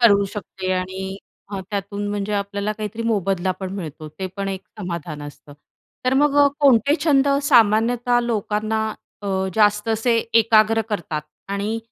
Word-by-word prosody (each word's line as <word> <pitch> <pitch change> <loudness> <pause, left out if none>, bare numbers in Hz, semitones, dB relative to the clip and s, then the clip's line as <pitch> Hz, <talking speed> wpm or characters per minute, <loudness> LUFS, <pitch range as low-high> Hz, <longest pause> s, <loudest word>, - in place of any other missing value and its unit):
करू 200 -4 +6
शकते 185 -2 -4
आणि 190 +1 -3 0.4
अ, 195 - -3
त्यातून 200 0 -3
म्हणजे 205 0 -2
आपल्याला 200 +1 -1
काहीतरी 215 +1 -5
मोबदला 195 -4 0
पण 190 -1 -4
मिळतो, 155 -4 -7
ते 190 +5 -6
पण 195 0 -2
एक 190 -1 -3 0.2
समाधान 170 -5 -5
असतं. 145 0 -11 0.5
तर 255 +1 +2
मग 290 -1 +3
अ, - - +6
कोणते 280 0 +5
छंद 280 -3 +4
सामान्यतः 240 -1 +4
लोकांना 220 -1 -1 0.4
अ, - - -5 0.3
जास्त 210 0 +3
असे 225 +2 +2 0.2
एकाग्र 225 0 +4
करतात 160 -6 -3 0.3
आणि 200 +3 -2
205 Hz, 145 wpm, -22 LUFS, 190-225 Hz, 0.5 s, करू